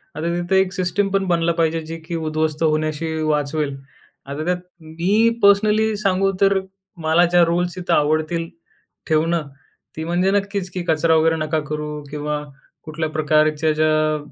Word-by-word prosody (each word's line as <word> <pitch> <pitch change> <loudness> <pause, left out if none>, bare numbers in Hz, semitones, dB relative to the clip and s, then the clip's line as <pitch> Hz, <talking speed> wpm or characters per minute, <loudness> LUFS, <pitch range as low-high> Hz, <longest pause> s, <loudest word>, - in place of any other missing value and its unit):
आता - - -5
तिथं 175 +2 -1
एक 190 -1 +2
सिस्टमपण 195 +2 0
बनला 170 -1 +2
पाहिजे 165 0 +1
जी 165 +1 -6
की 170 0 -4
उध्वस्त 155 -1 -1
होण्याशी 155 0 0
वाचवेल. 150 -1 -1 0.5
आता 140 +3 -5
त्यात 180 0 +1 0.2
मी 180 +8 +1
पर्सनली 210 +2 +4
सांगू 195 -1 +1
तर, 195 0 +4 0.4
मला 160 +1 +3
ज्या 175 0 +4
रूल्स 175 +1 -1
इथं 175 -1 -1
आवडतील 155 +2 +1 0.6
ठेवणं, 160 0 +1 0.5
ती 160 - -4
म्हणजे 175 +3 +1
नक्कीच 200 -1 -1
की 180 -2 -4
कचरा 160 +1 +3
वगैरे 160 +1 +3
नका 155 0 -1
करू 150 0 -4
किंवा 150 0 -3 0.4
कुठल्या 155 0 -4
प्रकारच्या 155 0 +2
ज्या 155 0 +2
165 Hz, 145 wpm, -21 LUFS, 155-180 Hz, 0.6 s, पर्सनली